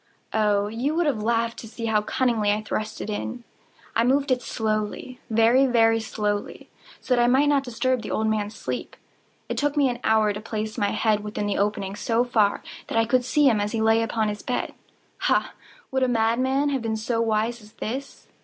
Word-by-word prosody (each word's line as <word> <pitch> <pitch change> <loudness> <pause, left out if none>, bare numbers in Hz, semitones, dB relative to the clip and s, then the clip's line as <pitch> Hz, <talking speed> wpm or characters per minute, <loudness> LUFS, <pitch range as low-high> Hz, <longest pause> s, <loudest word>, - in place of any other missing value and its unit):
Oh, 210 -2 +2
you 240 +8 -2
would 345 0 +2
have 265 -8 0
laughed 230 +1 0
to 225 - -8
see 230 +1 -6
how 220 -2 +2
cunningly 225 -2 +1
I 210 +1 -1
thrust 215 0 -4
it - - -5
in! 235 +3 -4 0.5
I 230 - +3
moved 275 +3 +2
it 250 -1 +2
slowly—very, 225 +3 +1
very 225 -2 +4
slowly, 210 -2 -3 0.3
so 255 - +1
that 240 - +3
I 240 - +4
might 270 +4 +4
not 280 -2 +3
disturb 255 0 -1
the 215 - -7
old 220 - 0
man's 215 -1 -1
sleep. - - -5 0.5
It - - -2
took 290 0 0
me 280 -2 +4
an 240 -1 -4
hour 220 -1 +3
to 210 - -6
place 215 -1 -4
my 205 - +1
whole - - -2
head 215 -2 +2
within 210 0 -3
the 205 - -1
opening 200 -1 -1
so 230 +3 +1
far 220 -5 +1 0.2
that - - -2
I 225 - +4
could 250 +2 +2
see 295 +4 +2
him 220 -5 +3
as 210 +2 -2
he 225 - 0
lay 225 +1 +4
upon 225 -1 0
his 210 0 -5
bed. 250 - -2 0.5
Ha!—would 270 - -2
a 260 - +3
madman 250 +5 +1
have 270 -3 -1
been 225 -1 -2
so 230 +1 -1
wise 225 +1 0
as 210 +1 -17
this? 265 +6 -6
225 Hz, 210 wpm, -24 LUFS, 215-250 Hz, 0.5 s, very